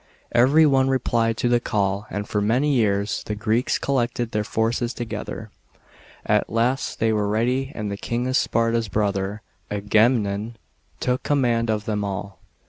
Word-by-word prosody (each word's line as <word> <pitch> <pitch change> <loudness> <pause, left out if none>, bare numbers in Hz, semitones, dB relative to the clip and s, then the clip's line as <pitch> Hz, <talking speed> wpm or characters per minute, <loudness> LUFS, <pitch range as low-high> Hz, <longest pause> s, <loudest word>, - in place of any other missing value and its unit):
Every 140 +7 +5
one 135 -2 +3
re 135 - +3
plied 115 -2 0
to 120 - 0
the 120 0 +3
call, 100 -2 -1
and 105 +1 -4
for 105 - -1
many 125 +8 +2
years, 100 -4 +1
the 105 - -2
Greeks 110 +3 0
collected 120 -3 -1
their 105 0 0
forces 115 +3 -1
together. 110 -1 -6 0.7
At - - +1
last 120 +4 0
they 110 0 +2
were 105 -1 0
ready, 125 +6 0
and 105 -2 -3
the 100 - -4
King 120 +4 -2
of 130 0 -1
Sparta's 115 -1 +1
brother, 100 0 -1 0.3
Aga 105 +3 +3
memnon, 110 -1 -2 0.4
took 125 0 0
command 120 -5 +1
of 110 -1 -1
them 105 -3 -1
all. 100 0 -5
115 Hz, 165 wpm, -23 LUFS, 105-120 Hz, 0.7 s, Every